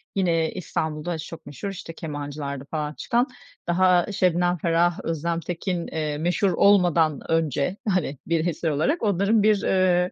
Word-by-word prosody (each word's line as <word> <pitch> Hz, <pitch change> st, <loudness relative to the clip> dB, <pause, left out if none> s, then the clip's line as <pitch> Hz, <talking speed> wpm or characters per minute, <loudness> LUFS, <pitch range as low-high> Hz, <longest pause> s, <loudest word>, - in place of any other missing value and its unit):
yine 165 Hz, -4 st, +1 dB
İstanbul'da 160 Hz, -1 st, -3 dB
çok 160 Hz, 0 st, -9 dB
meşhur 145 Hz, +8 st, -6 dB
işte 175 Hz, -3 st, -7 dB
Kemancı'larda 145 Hz, -3 st, -5 dB
falan 150 Hz, -1 st, -2 dB
çıkan, 240 Hz, -, 0 dB, 0.4 s
daha 180 Hz, +2 st, +3 dB
Şebnem 180 Hz, -1 st, +2 dB
Ferah, 170 Hz, +1 st, +1 dB
Özlem 165 Hz, +1 st, -1 dB
Tekin, 175 Hz, +1 st, -3 dB
eee, 155 Hz, -2 st, -3 dB
meşhur 180 Hz, +5 st, +1 dB
olmadan 170 Hz, -6 st, +4 dB
önce, 160 Hz, 0 st, +1 dB
hani 180 Hz, -7 st, 0 dB
bir 165 Hz, -1 st, +1 dB
eser 165 Hz, 0 st, -1 dB
olarak 230 Hz, -, 0 dB
onların 205 Hz, +1 st, +2 dB
bir, 210 Hz, -2 st, +4 dB
eee, 180 Hz, -1 st, +2 dB
170 Hz, 140 wpm, -24 LUFS, 155-185 Hz, 0.4 s, olmadan